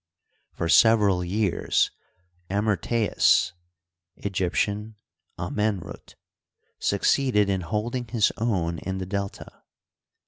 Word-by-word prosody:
For 85 - -3
several 100 -1 +5
years 95 +1 +1 0.6
AmyrtcBus 105 +2 +2 0.7
(Eg)rptian, 100 +3 -1 0.4
Amenruf) 100 +1 -3 0.6
succeeded 105 -7 +2
in 95 -1 -1
holding 115 +7 -3
his 110 -3 +2
own 90 -8 -1
in 95 +1 -4
the 95 - -4
Delta. 100 +1 -5
100 Hz, 80 wpm, -25 LUFS, 95-110 Hz, 0.7 s, several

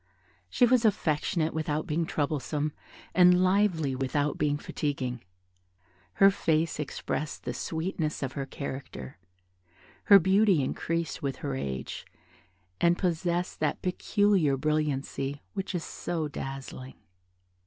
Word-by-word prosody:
She 250 - +4
was 245 0 +4
affectionate 165 -5 +1
without 155 0 -1
being 165 -1 -1
troublesome, 150 0 -1 0.4
and 180 0 +6
lively 185 -8 +2
without 145 +3 0
being 145 -1 +1
fatiguing; 130 -5 -3 0.9
her 195 0 +6
face 160 -4 0
expressed 150 0 -3
the 125 - -3
sweetness 160 +2 -3
of 130 - -2
her 135 -1 -4
character: 130 - -7 0.9
her 200 - +9
beauty 190 -3 +4
increased 165 +4 -2
with 135 -2 -2
her 140 - -1
age, 65 - -4 0.7
and 170 0 +4
possessed 175 0 -1
that 150 -2 -1
peculiar 185 -5 +2
brilliancy 145 -1 -1
which 195 -1 -3
is 170 - -2
so 165 -3 -3
dazzling. 135 -2 -7
155 Hz, 115 wpm, -28 LUFS, 140-180 Hz, 0.9 s, her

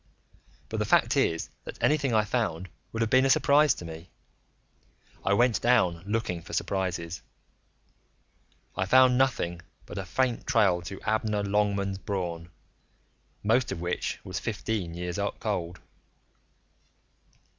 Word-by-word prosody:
But - - -3
the - - 0
fact - - +3
is 80 0 0
that - - -8
anything 145 -3 +2
I 110 -2 +3
found 100 -6 -2 0.2
would 115 - -3
have 115 - 0
been 130 +1 +5
a 135 - +2
surprise 145 +1 +5
to 85 - -9
me; 80 +1 -9 1.1
I 100 - +2
went 120 +2 +3
down 100 -9 +3
looking 105 -5 -1
for - - -11
surprises. 90 -4 -2 1.5
I 95 - -1
found 130 +3 +6
nothing 120 -10 +1 0.2
but - - -7
a 95 - -4
faint 125 +5 -1
trail 95 -6 +3
to 95 +3 -7
Abner 110 -1 0
Longmans 100 -1 0
Braun, 85 -4 -4 0.9
most 115 +4 +2
of - - -4
which 85 +1 -2
was - - -4
fifteen 95 -7 -3
years 90 +2 -4 0.2
cold. 90 -5 -3
100 Hz, 135 wpm, -28 LUFS, 85-115 Hz, 1.5 s, found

